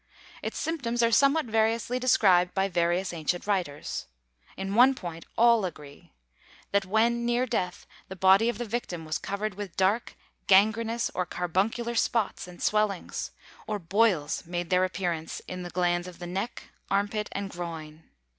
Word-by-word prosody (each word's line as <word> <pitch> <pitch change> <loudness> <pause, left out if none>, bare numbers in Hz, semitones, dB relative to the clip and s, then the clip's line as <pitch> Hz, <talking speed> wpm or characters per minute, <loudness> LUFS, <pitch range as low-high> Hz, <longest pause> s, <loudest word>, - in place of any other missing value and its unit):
Its - - -4
symptoms 240 -8 -1
are 230 - +3
somewhat 280 +6 +4
variously 225 +2 +1
described 190 -8 +4
by 195 0 +2
various 175 0 0
ancient 170 +2 -2
writers. 180 -8 -2 0.5
In 195 +1 -3
one 255 +4 +6
point 170 -7 -7
all 235 -2 +5
agree: 150 -5 -8 0.6
that 200 -1 +1
when 230 +4 +2
near 240 +1 +1
death 180 -7 -2 0.2
the 190 - -7
body 190 +5 +5
of 240 - -2
the 240 - -3
victim 205 -7 -4
was 155 0 -2
covered 200 +1 -3
with 200 -1 -7
dark, 195 +5 +1 0.3
gangrenous 220 +4 +3
or 180 -1 -1
carbuncular 205 +7 -1
spots 230 -5 0
and 180 -1 -10
swellings, 210 -3 0 0.4
or 215 - -1
boils 185 -4 +1
made 175 +1 -4
their 185 0 +4
appearance 175 -4 -3
in 180 0 -5
the 175 - -6
glands 175 0 0
of 180 - -10
the 175 - -7
neck, 195 +7 -5 0.2
armpit 205 +2 0
and 200 0 -4
groin. 160 -3 -7
195 Hz, 155 wpm, -28 LUFS, 175-230 Hz, 0.6 s, one